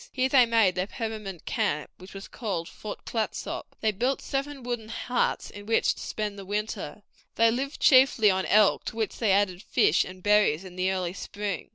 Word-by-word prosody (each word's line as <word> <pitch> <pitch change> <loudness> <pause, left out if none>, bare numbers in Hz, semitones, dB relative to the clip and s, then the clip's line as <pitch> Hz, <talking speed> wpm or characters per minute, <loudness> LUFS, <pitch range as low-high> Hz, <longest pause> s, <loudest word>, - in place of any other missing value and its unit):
Here 260 0 0
they 255 -3 +5
made 225 -5 +3
their 185 +1 -2
permanent 215 -6 -6
camp, 150 +1 -1
which 185 +2 -13
was 195 - -8
called 185 -8 -4
Fort 210 - -8
Clatsop. 220 -2 -4
They 220 - +2
built 245 +7 -1
seven 275 -1 -4
wooden 240 -3 -4
huts 245 +2 -1
in 205 0 -11
which 225 - +2
to - - -11
spend 210 -2 -4
the - - -7
winter. 205 -2 -4 0.3
They 230 0 +4
lived 270 +4 -3
chiefly 255 -6 +6
on 190 0 -1
elk, 210 -1 +4
to - - -5
which 225 -2 -3
they 220 -4 +2
added 190 -2 +2
fish 170 - +3
and 185 0 -11
berries 205 -6 +3
in 180 -1 -11
the 185 +1 0
early 180 -2 -2
spring. 200 -2 -5
210 Hz, 195 wpm, -27 LUFS, 190-230 Hz, 0.3 s, chiefly